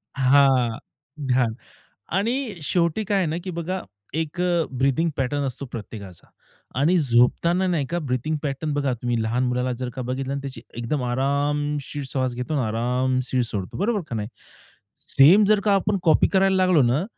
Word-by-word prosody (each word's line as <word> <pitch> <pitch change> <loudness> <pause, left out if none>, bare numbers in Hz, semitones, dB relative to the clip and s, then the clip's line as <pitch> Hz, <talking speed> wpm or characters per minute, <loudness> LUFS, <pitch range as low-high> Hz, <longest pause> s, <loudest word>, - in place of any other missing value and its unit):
हां. 130 -3 +4 0.5
ध्यान 125 -3 +2 0.6
आणि 235 +2 -1
शेवटी 170 +6 0
काय 200 0 0
आहे 180 - +1
ना, 155 +2 -2
की 185 - -4
बघा 175 +2 -3 0.3
एक 160 +2 -3 0.4
ब्रीथिंग 140 +5 +2
पॅटर्न 140 +2 -1
असतो 130 +2 -5
प्रत्येकाचा 100 -5 -9 0.5
आणि 170 +6 +3
झोपताना 155 +8 +3
नाही 160 -7 0
का 170 +4 -2
ब्रीथिंग 145 +1 -2
पॅटर्न 145 +1 -2
बघा 140 -3 0
तुम्ही 120 -1 -2
लहान 120 +3 0
मुलाला 125 0 0
जर 125 - -2
का 130 - -4
बघितलं 130 +2 -3
आणि 140 - -2
त्याची 135 -1 -7
एकदम 120 +4 -2
आरामशीर 145 +3 -1
श्वास 130 -2 -1
घेतो 125 +5 -4
आणि 135 - +1
आरामशीर 125 +3 0
सोडतो, 100 -5 -5
बरोबर 210 +3 +1
का 115 - -3
नाही? 105 -1 -3 0.8
सेम 180 +10 +6
जर 210 -1 +4
का 205 -2 +4
आपण 195 +1 +1
कॉपी 160 -3 +4
करायला 190 0 +3
लागलो 185 -6 +4
ना 130 +9 +2
140 Hz, 165 wpm, -23 LUFS, 125-170 Hz, 0.8 s, सेम